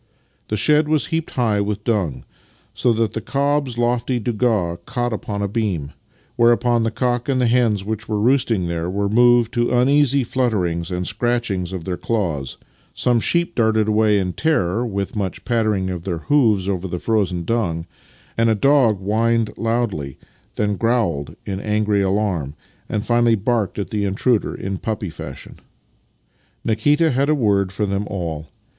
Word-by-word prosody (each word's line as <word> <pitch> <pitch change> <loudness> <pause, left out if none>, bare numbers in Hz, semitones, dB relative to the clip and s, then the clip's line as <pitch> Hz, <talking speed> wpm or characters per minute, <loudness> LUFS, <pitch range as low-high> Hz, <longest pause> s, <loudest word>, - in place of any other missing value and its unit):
The 105 - -2
shed 150 +7 +3
was 155 -1 +1
heaped 165 -1 -1
high 110 -5 +1
with 105 0 -3
dung, 100 - -1 0.5
so 120 - +1
that 115 -1 0
the 110 - -3
cob's 140 -2 0
lofty 120 +1 0
douga 110 -7 0
caught 120 -1 -1
upon 100 -1 -4
a - - 0
beam; 100 -9 -2 0.5
whereupon 120 0 +3
the 115 - +1
cock 120 +2 -1
and 130 -2 +1
hens 115 -5 +2
which 110 0 -4
were 105 -1 0
roosting 115 -5 +2
there 85 0 -2
were 100 +2 -1
moved 120 +1 +4
to 120 -1 +1
uneasy 135 +2 +3
flutterings 95 -10 -1
and 90 -1 -3
scratchings 115 -8 -1
of 95 -3 -5
their 90 -1 -3
claws, 85 - -2 0.4
some 120 -1 +2
sheep 170 +8 +1
darted 110 -2 +2
away 110 -1 +3
in 90 -2 -1
terror, 120 - 0
with 100 -2 -4
much 100 -3 -3
pattering 110 -6 0
of 90 -2 -4
their 85 -1 -3
hoofs 110 - +2
over 95 -1 -2
the 90 - -4
frozen 95 -4 0
dung, 85 -6 -1 0.5
and 115 0 +4
a 110 - +3
dog 130 -2 +3
whined 110 +3 +1
loudly, 115 - -2 0.4
then 105 -1 0
growled 115 - 0
in 95 -1 -3
angry 105 0 +1
alarm, 95 -7 -1 0.3
and 105 - -2
finally 120 -1 +3
barked 110 0 -1
at 100 +3 -4
the 105 -2 -1
intruder 105 +4 0
in 95 -1 -4
puppy 105 -5 -3
fashion. 80 -4 -9 1.1
Nikita 150 +8 +2
had 135 +3 +1
a 155 - +4
word 100 -7 +1
for 100 +2 -1
them 100 +1 -2
all. 80 -6 -4
110 Hz, 165 wpm, -20 LUFS, 95-120 Hz, 1.1 s, moved